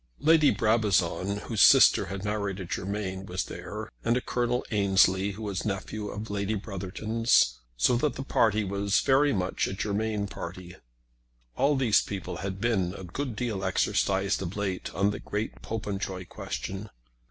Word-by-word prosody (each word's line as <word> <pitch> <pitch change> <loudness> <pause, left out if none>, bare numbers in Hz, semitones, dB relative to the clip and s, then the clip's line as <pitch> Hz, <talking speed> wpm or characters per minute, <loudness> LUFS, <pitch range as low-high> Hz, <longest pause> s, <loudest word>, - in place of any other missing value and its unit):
Lady 155 +1 +5
Brabazon, 100 -3 +1
whose 110 -4 -1
sister - - +7
had 95 +2 -5
married 100 -2 -2
a 95 - -5
Germain, 95 +1 -3
was 90 +1 -2
there, - - -7 0.2
and 120 - +2
a - - -1
Colonel 125 0 -1
Ansley, 100 -1 +3
who 110 +3 -8
was 100 -3 -2
a - - -4
nephew 105 +1 -4
of 105 +1 -6
Lady 100 +1 -1
Brotherton's; 100 - +1 0.2
so - - +3
that 145 +4 0
the 135 - -4
party 110 -5 +2
was 100 +1 +1
very 140 +2 +4
much 95 -5 -1
a - - -4
Germain 105 +1 -1
party. 90 -1 -8 0.8
All 140 +3 +3
these 125 -6 +4
people 100 -3 -5
had 95 +1 -4
been 100 -5 0
a - - -8
good 125 +7 -4
deal 105 -4 -2
exercised 95 +1 +1
of 95 +2 -5
late 100 -3 -3
on 100 +3 +2
the 105 - -5
great 105 +2 -4
Popenjoy 100 -4 -4
question. 95 +3 -6
100 Hz, 165 wpm, -28 LUFS, 95-110 Hz, 0.8 s, sister